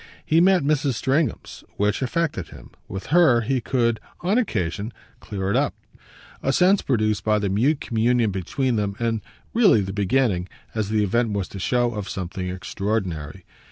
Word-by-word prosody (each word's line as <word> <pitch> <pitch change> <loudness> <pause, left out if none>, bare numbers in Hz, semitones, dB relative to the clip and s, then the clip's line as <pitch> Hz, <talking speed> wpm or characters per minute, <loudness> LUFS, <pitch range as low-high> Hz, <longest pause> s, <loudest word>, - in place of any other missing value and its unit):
He 160 +2 +4
met 185 -2 +4
Mrs. 145 -2 +1
Stringham's, 140 +6 -1
which 105 +4 +1
affected 135 - -1
him: - - -13 0.2
with 95 +1 -6
her 160 -9 +6
he 130 +2 0
could 115 -2 +1 0.2
on 195 +7 +2
occasion 100 - -2 0.3
clear 95 -3 -3
it - - +1
up 140 +1 +1 0.7
a 135 - +1
sense 185 +6 +4
produced 110 -5 0
by 105 0 +2
the 100 -1 -1
mute 130 +10 +2
communion 115 -1 +1
between 115 +7 -1
them 100 -1 -1
and 115 -2 -1 0.3
really 210 - +5
the 95 0 -4
beginning, 100 -2 +1 0.2
as 110 -3 -2
the 110 -1 +2
event 115 +2 +1
was 100 -3 -2
to 100 - -8
show, 120 +4 +1
of 105 -2 -5
something 90 -1 -4
extraordinary. 95 -3 -3
110 Hz, 165 wpm, -23 LUFS, 100-135 Hz, 0.7 s, her